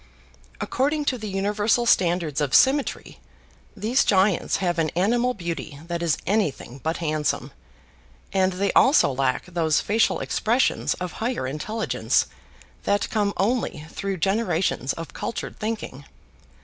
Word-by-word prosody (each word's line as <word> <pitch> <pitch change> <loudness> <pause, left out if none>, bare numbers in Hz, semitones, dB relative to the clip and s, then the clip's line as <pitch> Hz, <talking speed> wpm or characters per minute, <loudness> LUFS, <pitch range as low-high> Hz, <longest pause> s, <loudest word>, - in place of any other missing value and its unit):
According 290 +3 0
to 260 - +1
the 215 -1 -5
universal 205 +4 +1
standards 170 -8 +2
of 145 -2 +1
symmetry, 275 +1 +2 0.6
these 225 +7 +2
giants 195 -2 +2
have 175 -3 0
an 160 -1 +1
animal 240 +7 +2
beauty 170 -5 -5
that 170 0 -3
is 165 -3 +1
anything 155 - -1
but 160 +4 -1
handsome, 155 -3 -1 0.8
and 190 -1 +2
they 195 +2 0
also 265 - +5
lack 130 -1 0
those 170 -4 +1
facial 220 +2 +1
expressions 235 +4 +1
of 180 0 -5
higher 235 - -1
intelligence 185 +12 0 0.6
that 205 0 0
come 205 -2 +1
only 200 -7 -1
through 195 -1 -3
generations 190 - 0
of 165 -1 -8
cultured 230 - -5
thinking. 215 - -4
195 Hz, 130 wpm, -24 LUFS, 165-220 Hz, 0.8 s, also